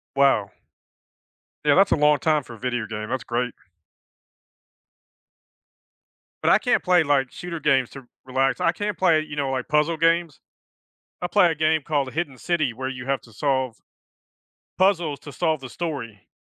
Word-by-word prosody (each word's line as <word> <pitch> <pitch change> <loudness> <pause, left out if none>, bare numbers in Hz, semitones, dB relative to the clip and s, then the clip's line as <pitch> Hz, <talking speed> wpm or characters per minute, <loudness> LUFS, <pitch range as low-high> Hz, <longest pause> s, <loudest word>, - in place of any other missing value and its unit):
Wow. 135 -8 +3 1.1
Yeah, 145 +2 +4
that's 195 +1 +4
a - - +5
long 150 -1 +4
time 155 0 +1
for 120 - -11
a - - -13
video 120 -2 -2
game, 105 0 -6
that's 130 -1 -2
great. 120 +1 -2 2.9
But - - +3
I - - +6
can't - - +1
play, 180 -3 +4
like, 135 -3 +1
shooter 170 -2 -7
games 135 -4 +2
to 135 - -10
r 125 - -23 0.2
relax, 135 +1 0
I 165 - +3
can 205 +3 -3
play, 165 -4 +3
you 150 -1 -7
know, 140 -2 -1
like, 130 -1 -3
puzzle 150 +2 +2
games. 165 -1 +1 0.8
I 175 - -1
play 185 -3 +4
a 160 - -1
game 155 0 +1
called 145 -4 -1
The - - -9
Hidden 145 -6 -3
City 155 -8 0
where 130 +3 -5
you 130 -1 -7
have 135 -1 0
to 115 - -18
solve 130 -2 -1 1.0
puzzles 175 -7 +2
to 145 - -10
solve 160 -4 0
the 130 -2 -9
story. 125 - -6
145 Hz, 175 wpm, -23 LUFS, 130-165 Hz, 2.9 s, I